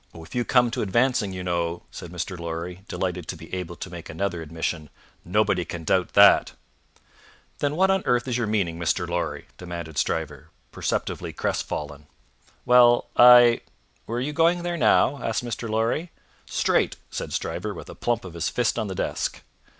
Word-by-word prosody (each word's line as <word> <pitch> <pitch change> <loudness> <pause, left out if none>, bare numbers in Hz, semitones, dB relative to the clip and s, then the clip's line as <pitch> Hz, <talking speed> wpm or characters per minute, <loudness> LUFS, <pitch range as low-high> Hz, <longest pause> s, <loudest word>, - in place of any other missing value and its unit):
"If 80 -1 -11
you 120 - 0
come 120 -1 +3
to - - -2
advancing 115 0 +1
you 90 -1 -5
know," 85 -1 -2
said 85 - -9
Mr. 90 +1 -4
Lorry, 85 +2 -6
delighted 90 -1 -3
to - - -4
be - - -13
able 90 -2 -4
to 95 - -7
make 85 -2 -9
another 90 0 -2
admission, 80 -1 -4 0.3
"nobody - - +1
can 85 -1 -7
doubt 90 +3 +1
that." - - +6 1.1
"Then 145 +1 0
what 190 +3 +3
on 190 0 +2
earth 125 0 +2
is 125 - -1
your 120 -2 0
meaning, 95 -6 -1
Mr. 85 +1 0
Lorry?" 85 0 -3
demanded 85 -4 -5
Stryver, 75 -4 -2 0.2
perceptibly - - -3
crestfallen. 75 0 -3 0.6
"Well! 120 -1 +5
I 120 -1 +8 0.5
Were 115 +2 -2
you 140 +4 -2
going 170 +2 +2
there 175 0 -2
now?" 145 -3 +3
asked 115 +2 -2
Mr. 115 -1 -4
Lorry. 115 +10 0 0.4
"Straight!" - - +1 0.2
said - - -5
Stryver, - - -3
with - - -9
a - - -9
plump 120 -3 -2
of 90 - -8
his 85 -1 -2
fist 120 -2 0
on 110 - -2
the 95 - -5
desk. - - -3
95 Hz, 175 wpm, -25 LUFS, 85-120 Hz, 1.1 s, I